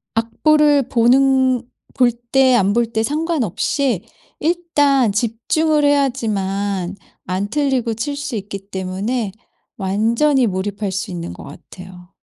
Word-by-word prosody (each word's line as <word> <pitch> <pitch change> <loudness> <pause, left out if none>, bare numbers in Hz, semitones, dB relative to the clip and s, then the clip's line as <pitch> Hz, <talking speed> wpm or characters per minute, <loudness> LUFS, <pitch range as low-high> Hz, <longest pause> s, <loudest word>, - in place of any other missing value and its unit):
악보를 290 +5 +2
보는 260 +1 +3 0.3
볼 250 -2 +4 0.2
때 265 -1 +5
안 200 -3 +2
볼 235 +1 +2
때 220 0 0
상관없이 280 - -1 0.4
일단 290 - +2
집중을 290 +8 +1
해야지만 205 -9 0 0.3
안 190 +3 -2
틀리고 265 -4 0
칠 285 +6 -3
수 280 -4 -5
있기 200 -1 -7
때문에 195 +4 -3 0.5
완전히 230 +7 +2
몰입할 200 +1 -3
수 195 +1 -3
있는 170 -1 -5
거 - - -11
같아요. 180 0 -13
230 Hz, 230 characters per minute, -19 LUFS, 200-275 Hz, 0.5 s, 때